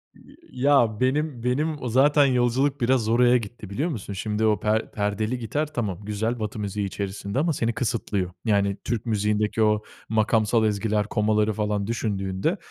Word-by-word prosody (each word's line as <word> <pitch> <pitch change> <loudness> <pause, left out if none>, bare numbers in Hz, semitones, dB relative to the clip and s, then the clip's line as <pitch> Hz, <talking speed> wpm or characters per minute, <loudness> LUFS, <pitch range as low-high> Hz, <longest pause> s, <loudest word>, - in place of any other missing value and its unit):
Y - - -18 0.2
ya 120 -7 +4
benim 130 -1 0
benim 145 +4 -1
o 125 - -3
zaten 145 +4 +5
yolculuk 130 +2 +1
biraz 120 -2 +2
oraya 125 +2 +5
gitti, 110 -2 -8
biliyor 140 - -1
musun? 110 - -5
Şimdi 105 +3 -1
o 105 -1 +2
per 110 +1 0
perdeli 105 +4 -1
gitar 145 +7 -2
tamam, 105 - -2
güzel, 110 +3 -2
Batı 105 0 -4
müziği 100 0 -2
içerisinde 100 +3 -4
ama 160 +2 +1
seni 115 -3 -1
kısıtlıyor. 105 -6 -2
Yani 100 -2 +1
Türk 120 -1 -2
müziğindeki 105 0 0
o 105 0 +2 0.3
makamsal 110 +1 +2
ezgiler, 105 0 0
komaları 105 0 +1
falan 105 -1 -1
düşündüğünde, 95 -5 -1
110 Hz, 160 wpm, -24 LUFS, 105-125 Hz, 0.3 s, zaten